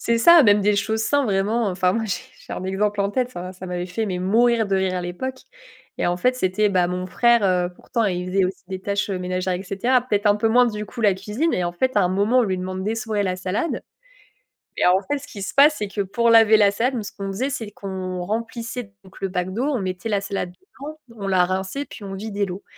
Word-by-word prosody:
c'est 235 - +1
ça, 330 +6 +7
même 205 -1 +5
des 205 +1 +2
choses 220 +2 0
simples, 285 +4 +2
vraiment. 210 +3 +1
Enfin, 180 -1 +1
moi 225 +1 -1
j'ai 200 - -3 0.2
j'ai - - -7
un - - -5
exemple 200 +2 -1
en 200 0 +1
tête, 250 +2 -1
ça 175 -8 -7
m'a 185 - -7
ça 185 0 -9
m'avait 180 -1 -3
fait, 210 +5 -3
mais, 180 -2 -3
mourir 230 +4 +3
de 195 - +2
rire 190 -1 0
à 180 - -1
l'époque, 260 +10 -5 0.6
et - - 0
en 175 - +1
fait, 250 +8 +1
c'était, 210 -1 +1
bah, 185 -3 +2
mon 180 +1 -3
frère, 235 +3 +3
heu, 180 -2 +2
pourtant, 230 +4 -2
il 180 -3 -1
faisait 190 0 +2
aussi 185 -1 -4
des 190 -1 -5
tâches 200 +1 -2
ménagères, 185 0 -2
et 180 - -4
cetera. 235 +7 +1
Peut-être 215 -4 -1
un 205 0 +5
peu 210 - 0
moins, 245 +2 +5
du 210 -2 -4
coup, 235 +4 -8
la 205 -4 +4
cuisine 210 - -2
et 180 - 0
en 175 - -2
fait, 255 +8 -1
à 205 - +5
un - - +2
moment, 205 +7 +2
on - - +5
lui 190 -3 -1
demande 185 +1 -4
d'essorer 215 -1 -1
la 185 - 0
salade, 185 - -2 1.0
et - - +2
en 185 +2 +4
fait, 290 - +2
ce 285 - -12
qui 205 -8 -9
se 195 - -4
passe, 290 +2 +6
c'est 210 - -2
que 205 - -2
pour 235 +5 +1
laver 225 -1 +7
la 205 -2 +5
salade, 235 +6 0
nous 225 - -3
ce 205 - -7
qu'on 195 - -4
faisait, 255 +8 -2
c'est 230 -6 -5
qu'on 185 -3 -5
remplissait 230 +1 -4
donc 190 0 -16
le 195 - 0
bac 180 0 -2
d'eau, 240 +6 -1
on 285 -4 0
mettait 185 +2 -4
la 205 -2 +1
salade 195 -3 -3
dedans, 305 - -11 0.2
on 200 -2 -5
la 185 -2 +3
rinçait, 190 +9 -3
puis 215 - -11
on 195 - -6
vidait 200 0 -2
l'eau. 185 +1 -7
200 Hz, 260 wpm, -22 LUFS, 185-230 Hz, 1.0 s, ça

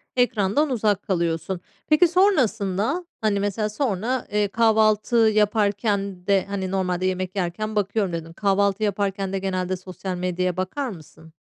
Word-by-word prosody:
ekrandan 245 +3 +2
uzak 210 -5 +1
kalıyorsun. 170 -1 -1 0.3
Peki, 305 +3 +5
sonrasında? 275 - +1 0.2
Hani, 210 -2 +1
mesela 205 +1 -1
sonra, 235 +1 -1
eee, 210 0 +2
kahvaltı 220 +1 +3
yaparken 205 -3 +1
de 195 -2 +3
hani, 190 -2 -3
"Normalde 185 -1 -1
yemek 185 0 -2
yerken 200 +4 -2
bakıyorum." 205 -2 0
dedin. 165 0 -5
Kahvaltı 200 +2 +1
yaparken 195 -1 -1
de 195 - 0
genelde 185 -1 -2
sosyal 185 0 -6
medyaya 180 0 -1
bakar 250 +9 -2
mısın? 160 -3 -13
200 Hz, 135 wpm, -23 LUFS, 185-215 Hz, 0.3 s, Peki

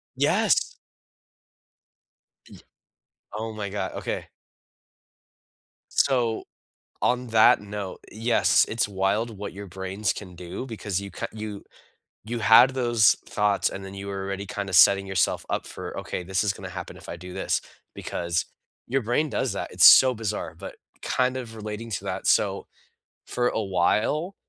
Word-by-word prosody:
Yes. - - +2 1.7
Y - - -15 0.7
Oh 110 +1 -4
my 105 -2 -4
god. 95 -1 -4
Okay. - - -4 1.6
So, 120 -5 +1 0.6
on 125 0 +1
that 110 -2 +5
note, 105 -2 -6
yes, 110 -4 +3
it's 115 -1 0
wild 100 +3 -1
what 100 0 -6
your 100 +1 -8
brains 95 +3 -2
can 90 -3 -9
do 90 +7 -7
because 105 -5 -3
you 100 0 -8
ca - - -4
you 105 -2 -7 0.6
you 115 +2 -4
had 115 +4 +7
those 120 -4 +3
thoughts, 105 -1 +1
and 95 - -7
then 95 0 -8
you 100 0 -7
were 100 -1 -4
already 100 0 -4
kinda 100 -1 -5
setting 100 +4 +6
yourself 95 -2 0
up - - -2
for, - - -7
"Okay, - - -5
this 95 +2 0
is 105 -2 +1
gonna - - -8
happen - - -7
if - - -14
I - - -5
do 90 +1 -10
this," - - -1 0.3
because, 85 0 -2 0.4
your 135 +2 0
brain 125 +7 0
does 130 -3 -1
that, 100 - -5
it's - - +5
so 130 -1 +8
bizarre, 105 -7 -4
but 95 +4 -9 0.3
kind 130 0 0
of 115 -3 -7
relating 110 +1 -6
to 95 - -3
that, - - -3
so, - - +2 0.6
for 125 0 0
a 110 - -1
while, 105 - +1
105 Hz, 155 wpm, -25 LUFS, 95-115 Hz, 1.7 s, so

